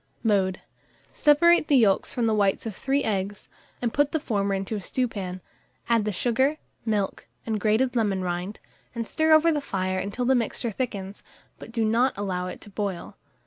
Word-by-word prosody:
Mode. 195 -4 +1 0.5
Separate 320 +2 +5
the 285 - +5
yolks 205 -6 +3
from 240 - -1
the 220 - +2
whites 200 -1 +1
of 220 -4 -4
3 275 +5 0
eggs, 200 -1 -2 0.4
and 235 - 0
put 290 0 +2
the 315 - +2
former 200 -7 -1
into 195 +3 -3
a 205 - -4
stewpan; 190 -5 -3 0.5
add 230 -3 +3
the 210 - 0
sugar, 255 +9 +1 0.3
milk, 205 -3 -1 0.2
and 220 -2 -1
grated 230 +5 +2
lemon 200 -5 +1
rind, 180 +3 -3 0.4
and 230 -1 -2
stir 315 +6 +1
over 315 +2 +6
the 295 -2 0
fire 185 -6 -2
until 205 +6 -3
the 265 - +4
mixture 235 -1 -1
thickens; 200 -4 -4 0.4
but - - -10
do 230 -1 0
not 235 +3 +2
allow 185 -3 -2
it 180 - -8
to 205 - -12
boil. 195 -3 -4
215 Hz, 185 wpm, -25 LUFS, 195-255 Hz, 0.5 s, over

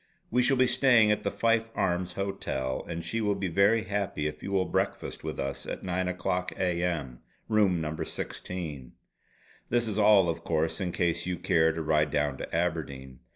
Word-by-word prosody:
We 125 +2 +3
shall 130 +2 +3
be 130 - +5
staying 120 -4 +5
at 105 - +1
the - - -1
Fife 115 0 +1
Arms 90 -2 0
Hotel, 65 -9 -3
and 85 0 -4
she 115 +6 -1
will 105 -1 +1
be 100 -2 -2
very 100 +6 +3
happy 100 -7 -2
if 75 0 -4
you 100 - -5
will 95 -1 +2
breakfast - - -2
with - - -5
us 70 +1 -4
at - - -5
nine 95 0 -1
o'clock 90 0 -1
A. 90 -2 0
M. 75 -9 -2 0.3
Room 105 -5 +3
No. 80 0 -3
16. 80 -6 -5 0.8
This 120 0 +1
is 110 0 -2
all 105 -3 +6
of 85 - -2
course 80 +1 0
in 90 -2 -1
case 85 0 0
you 90 -1 -1
care 80 -1 +3
to 80 0 -4
ride 75 0 +2
down 75 -2 0
to - - -5
Aberdeen. 70 -7 -2
90 Hz, 195 wpm, -28 LUFS, 80-100 Hz, 0.8 s, all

